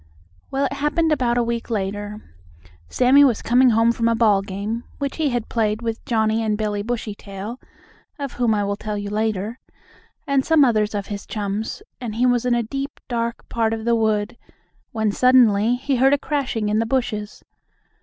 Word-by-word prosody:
Well, 275 Hz, +1 st, 0 dB
it 275 Hz, -, -2 dB
happened 295 Hz, +3 st, 0 dB
about 245 Hz, -5 st, +1 dB
a 240 Hz, -, +3 dB
week 235 Hz, 0 st, -3 dB
later. 205 Hz, -, -4 dB, 0.6 s
Sammie 260 Hz, +3 st, +5 dB
was 250 Hz, -6 st, +2 dB
coming 250 Hz, +2 st, +4 dB
home 225 Hz, 0 st, +4 dB
from 230 Hz, 0 st, 0 dB
a 230 Hz, -, +2 dB
ball 215 Hz, -4 st, +3 dB
game, 200 Hz, +4 st, -4 dB
which 280 Hz, -1 st, -3 dB
he 310 Hz, -3 st, +1 dB
had 240 Hz, -3 st, -2 dB
played 220 Hz, -1 st, -1 dB
with 225 Hz, -1 st, -3 dB
Johnnie 220 Hz, -3 st, +1 dB
and 215 Hz, -2 st, 0 dB
Billie 210 Hz, -1 st, -2 dB
Bushytail 210 Hz, 0 st, -5 dB, 0.6 s
(of 280 Hz, -3 st, -5 dB
whom 235 Hz, -3 st, +1 dB
I 205 Hz, -, 0 dB
will 200 Hz, 0 st, -1 dB
tell 210 Hz, 0 st, -4 dB
you 205 Hz, 0 st, -5 dB
later), 215 Hz, +2 st, -2 dB, 0.7 s
and 275 Hz, -1 st, +2 dB
some 315 Hz, -2 st, +5 dB
others 215 Hz, -3 st, +1 dB
of 200 Hz, -1 st, -2 dB
his 200 Hz, -1 st, -7 dB
chums, 210 Hz, -, -4 dB, 0.2 s
and 235 Hz, -4 st, -5 dB
he 245 Hz, +2 st, +2 dB
was 245 Hz, -1 st, +2 dB
in 245 Hz, -, +3 dB
a 235 Hz, -, +1 dB
deep, 275 Hz, +5 st, -5 dB
dark 235 Hz, -1 st, -3 dB
part 225 Hz, -1 st, 0 dB
of 220 Hz, 0 st, -7 dB
the 235 Hz, -, +3 dB
wood, 220 Hz, +1 st, 0 dB, 0.5 s
when 220 Hz, -2 st, 0 dB
suddenly 240 Hz, -2 st, +4 dB
he 265 Hz, +1 st, -1 dB
heard 265 Hz, +3 st, +4 dB
a -, -, -2 dB
crashing 265 Hz, -8 st, -2 dB
in 210 Hz, +1 st, +1 dB
the 225 Hz, -, 0 dB
bushes. 220 Hz, -5 st, -2 dB
230 Hz, 190 wpm, -22 LUFS, 210-250 Hz, 0.7 s, Sammie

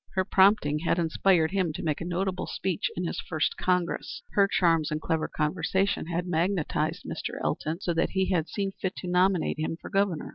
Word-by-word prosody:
Her 185 Hz, -1 st, +2 dB
prompting 190 Hz, -7 st, +4 dB
had 165 Hz, +1 st, 0 dB
inspired 170 Hz, 0 st, +2 dB
him 185 Hz, -5 st, 0 dB
to -, -, -6 dB
make 155 Hz, -1 st, -1 dB
a -, -, -3 dB
notable 185 Hz, +1 st, -2 dB
speech 185 Hz, -4 st, -2 dB
in 180 Hz, -, -1 dB
his -, -, -3 dB
first 160 Hz, -2 st, -1 dB
Congress. 180 Hz, -2 st, -1 dB
Her 200 Hz, -1 st, +4 dB
charms 165 Hz, -5 st, +2 dB
and 155 Hz, -, -2 dB
clever 160 Hz, 0 st, -1 dB
conversation 165 Hz, +5 st, 0 dB
had 175 Hz, +1 st, -2 dB
magnetized 170 Hz, -1 st, -1 dB
Mr. -, -, -5 dB
Elton 160 Hz, +4 st, -2 dB
so 175 Hz, -, 0 dB
that 165 Hz, -, +1 dB
he 190 Hz, 0 st, 0 dB
had 165 Hz, -3 st, +1 dB
seen 195 Hz, -2 st, -2 dB
fit 190 Hz, -1 st, -4 dB
to 180 Hz, -, -6 dB
nominate 180 Hz, -2 st, +2 dB
him 160 Hz, +1 st, -2 dB
for -, -, -10 dB
Governor. 195 Hz, -6 st, 0 dB
175 Hz, 195 wpm, -27 LUFS, 160-190 Hz, -, prompting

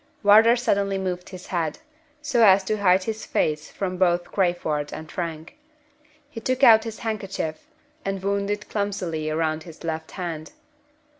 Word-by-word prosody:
Wardour 220 Hz, +3 st, +7 dB
suddenly 200 Hz, -5 st, 0 dB
moved 180 Hz, -2 st, -4 dB
his 185 Hz, -2 st, -10 dB
head, 165 Hz, -4 st, -2 dB, 0.5 s
so 260 Hz, -5 st, +2 dB
as 195 Hz, -2 st, +6 dB
to 215 Hz, +3 st, -1 dB
hide 190 Hz, -2 st, +3 dB
his 220 Hz, +1 st, -4 dB
face 155 Hz, 0 st, -1 dB
from 185 Hz, -2 st, -4 dB
both 175 Hz, -1 st, +1 dB
Crayford 175 Hz, -6 st, 0 dB
and 155 Hz, 0 st, -8 dB
Frank. 165 Hz, -3 st, -5 dB, 0.7 s
He 230 Hz, -6 st, -9 dB
took 255 Hz, +3 st, -1 dB
out 220 Hz, -2 st, +8 dB
his 225 Hz, -1 st, -6 dB
handkerchief, 195 Hz, -7 st, -4 dB, 0.4 s
and 195 Hz, -1 st, -3 dB
wound 200 Hz, 0 st, 0 dB
it 205 Hz, 0 st, -3 dB
clumsily 185 Hz, -7 st, -2 dB
round 155 Hz, 0 st, -1 dB
his 165 Hz, -1 st, -12 dB
left 160 Hz, -1 st, -4 dB
hand. 165 Hz, -4 st, -5 dB
190 Hz, 155 wpm, -24 LUFS, 165-205 Hz, 0.7 s, out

